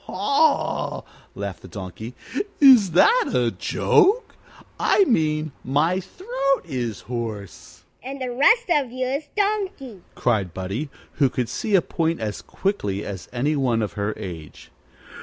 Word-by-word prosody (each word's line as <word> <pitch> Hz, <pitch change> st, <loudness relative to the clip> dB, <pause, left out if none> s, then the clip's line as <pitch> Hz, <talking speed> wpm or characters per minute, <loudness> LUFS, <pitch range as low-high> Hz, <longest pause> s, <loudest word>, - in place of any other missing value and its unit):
"Hee -, -, -8 dB
haw!" 280 Hz, +10 st, +1 dB, 0.3 s
laughed 100 Hz, -2 st, -5 dB
the -, -, -11 dB
Donkey. 100 Hz, +6 st, -8 dB, 0.4 s
"Is 245 Hz, -, +7 dB
that 455 Hz, -, +5 dB
a -, -, +2 dB
joke? 435 Hz, +6 st, +2 dB, 0.5 s
I 405 Hz, -, +4 dB
mean 155 Hz, -, +1 dB
my 155 Hz, +8 st, +1 dB
throat 275 Hz, -, -2 dB
is 125 Hz, -, -4 dB
hoarse." 115 Hz, -5 st, -7 dB, 0.2 s
"And 270 Hz, +2 st, -7 dB
the 255 Hz, -1 st, -3 dB
rest 370 Hz, -, +4 dB
of 280 Hz, -7 st, +2 dB
you 255 Hz, +1 st, -2 dB
is 275 Hz, +4 st, -2 dB
donkey!" 395 Hz, -, -2 dB
cried 105 Hz, -8 st, 0 dB
Buddie, 100 Hz, +11 st, -4 dB, 0.3 s
who 140 Hz, -3 st, +4 dB
could 125 Hz, -2 st, -2 dB
see 200 Hz, -, -1 dB
a 180 Hz, -, +4 dB
point 165 Hz, 0 st, -1 dB
as 105 Hz, -2 st, -4 dB
quickly 105 Hz, -, -2 dB
as 95 Hz, -3 st, -7 dB
any 140 Hz, +5 st, 0 dB
one 120 Hz, -5 st, +1 dB
of 100 Hz, -5 st, -4 dB
her 100 Hz, +3 st, -2 dB
age. 85 Hz, -7 st, -9 dB
155 Hz, 145 wpm, -23 LUFS, -, 0.5 s, Is